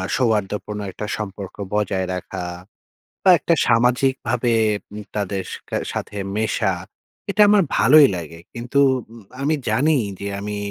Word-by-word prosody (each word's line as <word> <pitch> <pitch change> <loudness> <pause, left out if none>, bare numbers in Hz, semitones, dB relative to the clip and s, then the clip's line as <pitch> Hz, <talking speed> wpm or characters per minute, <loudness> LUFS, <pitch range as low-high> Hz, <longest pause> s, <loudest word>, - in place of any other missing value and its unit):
সৌহার্দ্যপূর্ণ 105 -3 -1
একটা 105 - -6
সম্পর্ক 100 -2 -6 0.2
বজায় 95 -3 0
রাখা 90 0 -5 0.8
বা 190 - +5
একটা 170 - +1
সামাজিকভাবে 125 0 +2 0.6
তাদের 100 -2 -2 0.3
কে - - -1 0.2
সাথে 105 - -5 0.2
মেশা। 110 -2 0 0.6
এটা 210 +1 +2
আমার 205 -3 +5
ভালোই 145 +3 +7
লাগে। 85 -1 -7
কিন্তু 120 +4 -1 0.3
উম 115 -3 -13 0.2
আমি 155 +3 +2
জানি 145 +8 +3 0.2
যে, 100 - -4
আমি 105 0 -4
110 Hz, 125 wpm, -21 LUFS, 100-130 Hz, 0.8 s, ভালোই